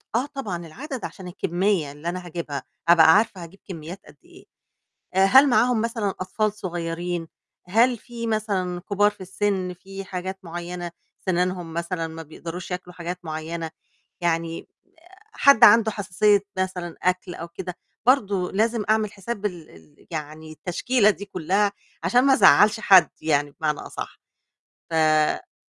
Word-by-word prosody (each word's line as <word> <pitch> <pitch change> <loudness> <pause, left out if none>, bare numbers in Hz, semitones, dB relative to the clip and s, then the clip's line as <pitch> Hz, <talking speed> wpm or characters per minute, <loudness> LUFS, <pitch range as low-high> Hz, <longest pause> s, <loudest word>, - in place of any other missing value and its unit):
آه 245 +3 +2
طبعًا، 200 - -5
العدَدْ 265 - -6
عشان 190 -2 -8
الكميّة 175 -3 0
اللي 150 +4 -5
أنا 180 0 -5
هاجيبها 160 -5 -5 0.2
أبقى 160 -2 +7
عارفة 205 -5 0
هاجيب 175 +4 -13
كميّات 170 +2 -7
قد - - -16
إيه، - - -17 0.7
هل 260 +9 +6
معاهم 240 -1 +3
مثلًا 230 -3 -1
أطفال 205 +3 -2
صغيّرين؟ 175 -2 -4 0.4
هل 235 +7 +3
في 235 0 -7
مثلًا 195 -5 -1
كبار 205 +2 +2
في 205 - -17
السن، 190 -1 -1
في 195 +2 -9
حاجات 190 +1 -5
معيّنة 175 0 -6 0.3
سنانهُم 180 -2 -1
مثلًا 170 0 -2
ما 165 0 -8
بيقدروش 170 +4 -8
ياكلوا 180 0 -5
حاجات 175 +1 -5
معيّنة؟ 160 +1 -5 0.5
يعني 165 -1 -1 0.7
حد 280 -4 +5
عنده 220 0 +6
حساسية 205 0 +2 0.2
مثلًا 180 -2 -3
أكل 180 0 0
أو 165 - -7
كده، 180 0 -7 0.3
برضه 200 -8 +2
لازم 225 +2 +1
أعمل 215 -1 +2
حساب 205 +1 -5
ال 175 -5 -4
ال 80 -2 -19
يعني 155 0 -6
التشكيلة 200 - +1
دي 205 - -8
كُلّها، 195 +2 0 0.3
عشان 200 +9 +4
ما 275 - +6
أزعّلش 210 - +6
حد 190 -4 +6
يعني 145 -2 +1
بمعنى 150 -2 0
أصَحّ، - - -7 0.7
ف - - -4
آه. 155 -1 +2
180 Hz, 145 wpm, -24 LUFS, 170-210 Hz, 0.7 s, أبقى